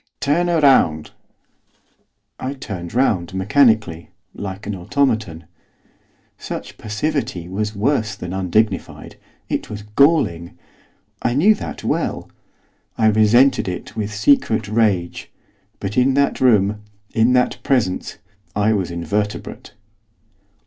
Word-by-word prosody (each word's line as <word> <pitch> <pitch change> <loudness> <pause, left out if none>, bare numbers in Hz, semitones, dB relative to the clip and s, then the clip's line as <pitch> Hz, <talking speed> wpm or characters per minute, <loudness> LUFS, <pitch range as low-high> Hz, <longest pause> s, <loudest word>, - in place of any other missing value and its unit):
'Turn 160 +5 +1
round!' 135 - +3 1.3
I 135 +2 -4
turned 100 -8 -7
round, 95 -9 +1
mechanically, 105 - +2 0.2
like 100 0 -7
an 105 - -3
automaton. 105 - -1 0.9
Such - - -7
passivity 105 - -3
was 105 +3 -3
worse 110 0 0
than 90 0 -7
undignified, 95 +4 -1 0.3
it - - -3
was 105 -1 -7
galling; 105 - +1 0.6
I 120 - 0
knew 190 +10 +5
that 205 - -7
well. - - -2 0.7
I 110 -1 +4
resented 110 +5 +4
it 90 -1 -6
with 105 -1 -3
secret 110 0 +2
rage. 105 -5 0 0.5
But 100 +5 -1
in 130 +1 +3
that 140 0 +1
room, 105 -4 +3 0.3
in 115 +3 +3
that 125 -1 +1
presence, 120 -9 -1 0.4
I 105 +2 +2
was 95 -4 -1
invertebrate. 100 +5 -4
105 Hz, 110 wpm, -20 LUFS, 95-130 Hz, 1.3 s, knew